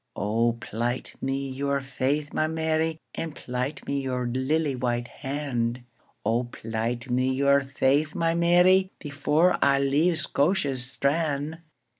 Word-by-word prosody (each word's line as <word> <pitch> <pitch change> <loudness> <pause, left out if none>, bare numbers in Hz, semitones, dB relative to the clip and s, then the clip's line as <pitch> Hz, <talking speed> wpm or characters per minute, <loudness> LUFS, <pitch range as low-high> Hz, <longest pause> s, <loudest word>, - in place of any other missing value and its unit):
O 115 +4 +1
plight 120 +2 -3
me 135 +1 -1
your 140 +1 -1
faith, 140 +2 -2
my 155 - +1
Mary, 160 0 0 0.2
And 165 -2 -5
plight 125 +4 -4
me 140 0 -1
your 125 -2 -2
lily 135 +4 0
white 120 -1 -1
hand;O 120 -4 -3
plight 120 +1 -4
me 130 +1 +2
your 140 +1 +3
faith, 140 +3 +1
my 165 0 +1
Mary, 180 +2 +4
Before 150 +4 +1
I 140 0 +4
leave 145 +5 +2
Scotia's 145 -5 +1
strand. 150 +1 0
140 Hz, 125 wpm, -26 LUFS, 125-155 Hz, 0.2 s, Mary